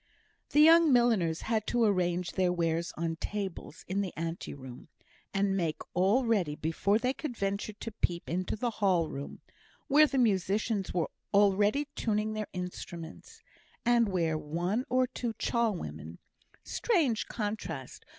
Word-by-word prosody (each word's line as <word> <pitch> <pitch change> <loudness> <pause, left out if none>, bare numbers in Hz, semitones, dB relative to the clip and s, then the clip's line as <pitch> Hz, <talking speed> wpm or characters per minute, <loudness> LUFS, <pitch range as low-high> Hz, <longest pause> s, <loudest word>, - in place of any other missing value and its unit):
The 295 - +4
young 325 0 +7
milliners 225 -10 +3
had 220 -2 -1
to 240 -1 +2
arrange 180 -4 +1
their 185 -2 +1
wares 170 -1 0
on 165 0 -2
tables 195 -5 -5
in 195 +2 0
the 190 -3 -3
ante 165 +1 -4
room, 130 -1 -10 0.4
and 195 0 +1
make 165 -5 -1
all 200 +8 +3
ready 190 -10 +1
before 165 +7 +1
they 250 +3 0
could 275 -5 -6
venture 200 +2 -2
to 225 +2 -7
peep 175 -5 -1
into 185 +4 -2
the 235 +2 -1
ball 180 -6 +2
room, 140 +1 -7 0.5
where 300 +2 +6
the 275 - -2
musicians 205 -2 +1
were 170 -3 -1 0.2
already 205 +7 +4
tuning 215 -1 0
their 215 -1 -3
instruments, 180 -2 -8 0.4
and 235 -2 +4
where 165 -4 0
one 175 - -2
or 255 +1 +3
two 240 -2 -4
char 235 -2 +1
women 80 - -7 0.5
(strange 315 - +1
contrast! 205 - -5
200 Hz, 150 wpm, -30 LUFS, 170-230 Hz, 0.5 s, young